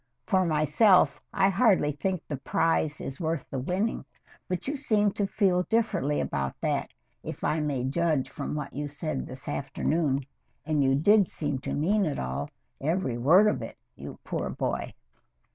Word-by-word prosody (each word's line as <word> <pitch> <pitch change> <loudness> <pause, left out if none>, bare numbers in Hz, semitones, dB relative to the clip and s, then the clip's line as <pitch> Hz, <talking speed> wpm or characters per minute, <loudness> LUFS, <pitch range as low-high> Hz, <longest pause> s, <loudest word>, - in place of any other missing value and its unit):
For 185 -1 +2
myself, 155 +1 +4
I 195 -1 +3
hardly 195 -7 +3
think 185 +4 -2
the 145 - -3
prize 150 +2 0
is 135 - -6
worth 160 -3 -2
the 135 - -2
winning, 185 - -1 0.4
but 180 +2 -3
you 285 - -1
seem 210 -7 +2
to 200 0 -1
feel 190 -3 +2
differently 195 -11 +1
about 70 -1 -2
that, - - -1 0.3
if - - -7
I 160 - +1
may 145 -4 -1
judge 150 +1 +1
from - - -5
what 150 -2 -5
you 145 +2 -3
said 145 -1 -4
this 130 0 -9
afternoon, 140 0 -1 0.4
and 150 -2 +1
you 135 0 +3
did 200 +6 +5
seem 145 -3 -2
to - - -4
mean 195 +7 +2
it 150 - -2
all, 65 0 -3 0.3
every 145 -5 -1
word 170 - +6
of 210 - +1
it, - - -7 0.2
you - - -9
poor - - -3
boy. - - -3
155 Hz, 170 wpm, -27 LUFS, 140-190 Hz, 0.4 s, word